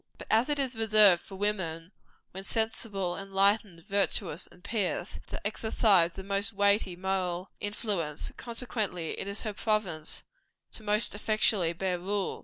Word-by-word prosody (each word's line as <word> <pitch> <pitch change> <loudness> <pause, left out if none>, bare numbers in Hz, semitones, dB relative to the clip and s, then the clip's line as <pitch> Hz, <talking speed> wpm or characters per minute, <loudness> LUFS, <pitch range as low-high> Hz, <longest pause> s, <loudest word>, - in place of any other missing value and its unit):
But - - -9
as 225 +5 +4
it 295 - +1
is 265 -3 0
reserved 215 -5 +6
for 195 - -11
woman, 185 -4 -2 0.4
when 190 +1 -7
sensible, 210 -4 -1
enlightened, 195 -2 +1
virtuous 195 -4 0
and 180 - -20
pious, 200 -4 -2
to - - -5
exercise 205 -5 +3
the 190 - -8
most 200 +3 -1
weighty 200 -2 +2
moral 185 -1 -2
influence, 205 -8 -2
consequently 220 -8 -2
it - - -4
is 200 +2 -2
her 215 -2 -3
province 195 -8 -1 0.6
most 210 0 +1
effectually 205 -4 +2
to - - -23
bear 185 -1 -1
rule. 195 +2 -1
200 Hz, 145 wpm, -29 LUFS, 180-215 Hz, 0.6 s, reserved